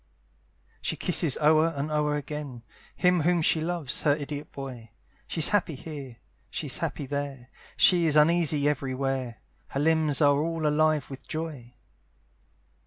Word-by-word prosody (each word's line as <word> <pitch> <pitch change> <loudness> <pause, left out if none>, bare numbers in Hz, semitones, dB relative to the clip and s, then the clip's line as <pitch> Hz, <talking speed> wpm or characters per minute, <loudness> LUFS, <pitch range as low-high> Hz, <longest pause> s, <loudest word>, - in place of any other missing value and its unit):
She - - -2
kisses 165 -6 +1
o'er 155 +1 +4
and 145 +2 -3
o'er 150 -1 +1
again, 145 -4 -6 0.3
Him 180 -1 +3
whom 170 +1 +2
she 160 - +3
loves, 165 -5 -2
her 145 -2 +3
idiot 145 0 -6
boy, 125 -5 -8 0.4
She's 160 -3 +3
happy 185 -7 +1
here, 135 -4 -8 0.3
she's - - -3
happy 145 - -3
there, 140 -2 -5 0.3
She 175 -3 +5
is 150 - +2
uneasy 155 -2 +3
every 135 -3 -1
where; 130 -3 -3 0.3
Her 135 - -4
limbs 155 -1 +2
are 145 -2 +4
all 165 0 -2
alive 150 -1 +2
with 135 - -10
joy. 150 -7 -6
150 Hz, 145 wpm, -27 LUFS, 140-160 Hz, 0.4 s, She